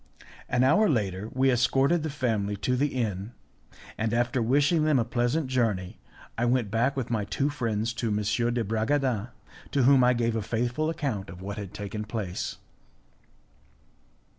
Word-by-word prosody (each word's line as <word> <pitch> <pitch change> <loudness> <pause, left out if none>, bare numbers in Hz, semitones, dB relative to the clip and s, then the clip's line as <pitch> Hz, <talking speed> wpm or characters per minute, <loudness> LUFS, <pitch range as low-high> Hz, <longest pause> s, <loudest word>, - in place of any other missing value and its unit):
An 125 0 +2
hour 175 +11 +4
later 105 -5 -1
we 130 +1 +3
escorted 135 +6 +2
the 160 - -3
family 110 -7 -1
to 125 +5 -1
the 140 +4 +2
inn, 110 -5 -3 0.7
and, 110 0 0
after 120 +2 +1
wishing 145 +7 +3
them 155 -2 +3
a 115 - +1
pleasant 120 +6 0
journey, 110 - -1 0.4
I 120 - +2
went 120 -4 +1
back 125 +5 +1
with 125 -3 -3
my 110 -3 0
two 135 +8 -1
friends 115 -4 -1
to 115 - 0
M. 105 - 0 0.4
de 120 -1 0
Bragadin, 115 +1 0 0.4
to 140 - +1
whom 135 0 +6
I 125 0 +4
gave 115 -1 0
a 110 - 0
faithful 120 +8 -1
account 125 - -3
of 90 +1 -9
what 100 +2 -5
had 100 -3 -6
taken 105 +1 -5
place. 105 -5 -4
120 Hz, 165 wpm, -27 LUFS, 105-135 Hz, 0.7 s, whom